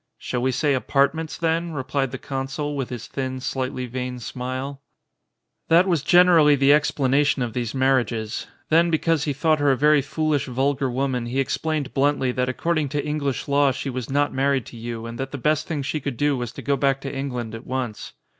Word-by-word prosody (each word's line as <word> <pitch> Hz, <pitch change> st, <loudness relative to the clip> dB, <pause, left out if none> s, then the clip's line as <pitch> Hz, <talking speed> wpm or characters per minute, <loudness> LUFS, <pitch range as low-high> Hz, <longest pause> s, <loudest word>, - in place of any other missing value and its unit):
"Shall 125 Hz, -, -3 dB
we 130 Hz, +1 st, +1 dB
say 140 Hz, +3 st, +1 dB
apartments 140 Hz, +4 st, 0 dB
then?" 165 Hz, 0 st, 0 dB
replied 135 Hz, -1 st, -1 dB
the 130 Hz, -, -5 dB
■consul, 135 Hz, +3 st, -4 dB
with 135 Hz, -3 st, -3 dB
his 120 Hz, -3 st, -6 dB
thin, 130 Hz, -1 st, -4 dB
slightly 130 Hz, -1 st, -3 dB
vain 125 Hz, +1 st, -4 dB
smile. 130 Hz, +3 st, -5 dB, 0.9 s
That 170 Hz, +3 st, +5 dB
was 170 Hz, -6 st, +2 dB
generally 165 Hz, -2 st, +6 dB
the 140 Hz, +1 st, +5 dB
explanation 145 Hz, -2 st, +2 dB
of 115 Hz, -2 st, -4 dB
these 120 Hz, 0 st, -3 dB
marriages. 125 Hz, -5 st, 0 dB, 0.2 s
Then 170 Hz, +2 st, +4 dB
because 160 Hz, -2 st, +1 dB
he 145 Hz, -, 0 dB
thought 155 Hz, +2 st, +2 dB
her 145 Hz, 0 st, +3 dB
a 135 Hz, -, +3 dB
very 150 Hz, +1 st, +4 dB
foolish 150 Hz, +1 st, -1 dB
vulgar 135 Hz, +2 st, 0 dB
woman 125 Hz, -1 st, -1 dB
he 130 Hz, +3 st, -1 dB
explained 150 Hz, +1 st, -1 dB
bluntly 135 Hz, -2 st, +2 dB
that 125 Hz, 0 st, -1 dB
according 155 Hz, +2 st, 0 dB
to 145 Hz, +1 st, -2 dB
English 150 Hz, -3 st, -2 dB
law 140 Hz, 0 st, +4 dB
she 135 Hz, +1 st, -4 dB
was 125 Hz, -2 st, -5 dB
not 145 Hz, +1 st, +1 dB
married 135 Hz, -2 st, +1 dB
to -, -, -11 dB
Yii 115 Hz, 0 st, -6 dB
and 115 Hz, 0 st, -8 dB
that 135 Hz, 0 st, -3 dB
the 145 Hz, -, -4 dB
best 150 Hz, +3 st, 0 dB
thing 150 Hz, -4 st, -2 dB
she 145 Hz, +3 st, -2 dB
could 135 Hz, -4 st, -4 dB
do 145 Hz, -1 st, +2 dB
was 120 Hz, -2 st, -4 dB
to -, -, -9 dB
go 140 Hz, -, +1 dB
back 135 Hz, -1 st, +1 dB
to 135 Hz, 0 st, -5 dB
England 125 Hz, -5 st, -4 dB
at 115 Hz, -, -9 dB
once. 125 Hz, -4 st, -4 dB
135 Hz, 200 wpm, -23 LUFS, 130-150 Hz, 0.9 s, generally